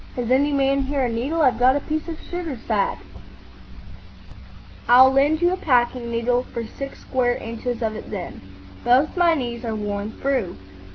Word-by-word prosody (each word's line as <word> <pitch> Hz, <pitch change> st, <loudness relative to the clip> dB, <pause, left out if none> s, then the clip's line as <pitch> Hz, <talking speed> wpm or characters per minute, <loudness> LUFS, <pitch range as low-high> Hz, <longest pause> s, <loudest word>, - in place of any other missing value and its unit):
Has 245 Hz, -1 st, -3 dB
any 280 Hz, +3 st, +3 dB
man 275 Hz, 0 st, +2 dB
here 275 Hz, 0 st, -1 dB
a -, -, -1 dB
needle? 270 Hz, +8 st, -1 dB
I've 255 Hz, -4 st, +3 dB
got 255 Hz, +2 st, +5 dB
a -, -, +1 dB
piece 310 Hz, +3 st, -4 dB
of 325 Hz, -2 st, -6 dB
sugar 345 Hz, -6 st, -5 dB
sack." 215 Hz, -3 st, -1 dB, 1.9 s
"I'll 260 Hz, +2 st, +8 dB
lend 290 Hz, +5 st, +2 dB
you 350 Hz, -, +4 dB
a -, -, -2 dB
packing 245 Hz, -5 st, +1 dB
needle 235 Hz, +1 st, 0 dB
for 235 Hz, -2 st, -6 dB
six 275 Hz, +5 st, -8 dB
square 245 Hz, -2 st, 0 dB
inches 230 Hz, +1 st, -5 dB
of 220 Hz, -1 st, -1 dB
it -, -, -8 dB
then. 190 Hz, -5 st, -6 dB, 0.4 s
Both 255 Hz, +5 st, +3 dB
my 345 Hz, -2 st, +4 dB
knees 240 Hz, -4 st, -4 dB
are 225 Hz, -2 st, -3 dB
worn 205 Hz, 0 st, -4 dB
through." 265 Hz, -10 st, -2 dB
255 Hz, 175 wpm, -22 LUFS, 235-280 Hz, 1.9 s, I'll